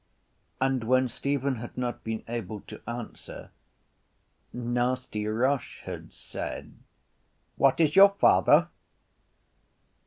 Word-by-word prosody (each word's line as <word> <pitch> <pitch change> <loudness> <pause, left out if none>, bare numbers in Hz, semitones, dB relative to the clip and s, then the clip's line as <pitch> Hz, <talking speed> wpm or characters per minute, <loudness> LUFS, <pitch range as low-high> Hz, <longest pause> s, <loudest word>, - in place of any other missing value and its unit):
And 130 -2 +1
when 130 +3 +3
Stephen 140 +1 -1
had 120 +2 -9
not 125 -1 -3
been 110 0 -4
able 110 -3 -5
to - - -11
answer 120 -1 -8 1.0
Nasty 120 -2 -2
Roche 125 +6 -1
had - - -7
asked: - - -7 0.9
—What - - +3
is 155 -1 +3
your 200 +1 +9
father? 200 - +4
125 Hz, 100 wpm, -27 LUFS, 115-135 Hz, 1.0 s, your